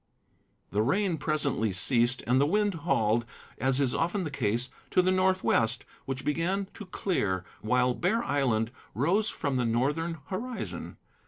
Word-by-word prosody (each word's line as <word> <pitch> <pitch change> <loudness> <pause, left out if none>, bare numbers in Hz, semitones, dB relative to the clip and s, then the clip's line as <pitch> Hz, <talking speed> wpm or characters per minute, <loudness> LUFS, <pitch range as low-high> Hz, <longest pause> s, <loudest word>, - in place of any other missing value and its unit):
The 105 - +1
rain 175 - +1
presently 140 -8 0
ceased, 120 +6 +2
and 125 +3 +3
the 145 - +3
wind 205 +3 +2
hauled, 120 -9 +1 0.4
as 130 +1 +2
is 135 -3 +2
often 175 +4 0
the 155 - -4
case, 120 -1 -1 0.2
to 185 - +3
the 185 - +3
northwest, 185 -11 +2 0.2
which 135 0 -4
began 170 +7 0
to 210 - -9
clear, 95 - -1 0.2
while 125 +2 +2
Bear 215 - 0
Island 120 - +1 0.2
rose 180 - +2
from 140 -4 -2
the 125 - +1
northern 150 +9 0
horizon. 240 +6 -5
140 Hz, 150 wpm, -29 LUFS, 120-185 Hz, 0.4 s, and